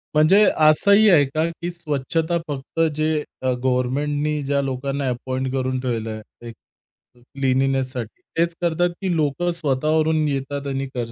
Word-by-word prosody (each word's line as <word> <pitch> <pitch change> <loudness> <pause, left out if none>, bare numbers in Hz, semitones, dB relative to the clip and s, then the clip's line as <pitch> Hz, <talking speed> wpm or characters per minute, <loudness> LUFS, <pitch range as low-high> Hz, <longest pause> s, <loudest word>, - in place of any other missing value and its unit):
म्हणजे 180 +8 +6 0.2
असंही 200 +7 +5
आहे 155 -6 +6
का 155 +4 -1
की 170 +1 -6
स्वच्छता 165 0 -2
फक्त 145 +1 -6 0.2
जे 155 +1 0 0.3
अ, 130 0 +1
गव्हर्नमेंटनी 145 +4 0
ज्या 140 0 0
लोकांना 135 +1 -2
अपॉइंट 130 +1 -3
करून 130 -1 -1
ठेवलंय 115 -3 -3 0.3
एक 115 - -9 0.6
अ, - - -23
क्लीनीनेससाठी, 130 -2 -1 0.2
तेच 170 0 +1
करतात 175 +1 +1
की 185 -3 0
लोक 150 +1 0
स्वतः 150 -3 -1
वरून 155 -1 +2
येतात 140 0 -3
आणि 135 0 -2
कर 120 -2 -3
140 Hz, 145 wpm, -22 LUFS, 130-160 Hz, 0.6 s, म्हणजे